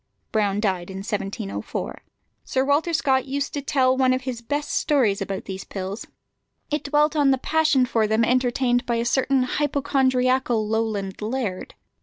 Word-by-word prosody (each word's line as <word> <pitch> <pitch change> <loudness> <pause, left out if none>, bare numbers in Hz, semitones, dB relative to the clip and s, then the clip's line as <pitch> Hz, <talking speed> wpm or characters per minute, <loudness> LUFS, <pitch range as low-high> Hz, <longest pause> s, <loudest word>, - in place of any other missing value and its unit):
Brown 205 -2 +1
died 190 -4 -1
in 190 - -6
1704. 200 0 -4 0.4
Sir 260 0 0
Walter 290 +5 +2
Scott 265 -5 +2
used 280 +2 -2
to 285 - -2
tell 265 -2 +2
one 260 -1 +3
of 255 0 -2
his 250 -3 -4
best 290 +5 -3
stories 245 -10 +2
about 195 0 -4
these 190 0 -6
pills. 195 +2 -6 0.6
It 300 - -1
dwelt 295 +2 +2
on 290 -2 +4
the 265 - +4
passion 305 -2 +2
for 225 -4 +1
them 220 +2 +2
entertained 245 0 +1
by 235 - +1
a 230 0 -1
certain 265 +1 +2
hypochondriacal 260 -4 +1
Lowland 215 -3 -2
laird. 215 -4 -3
255 Hz, 160 wpm, -23 LUFS, 215-275 Hz, 0.6 s, on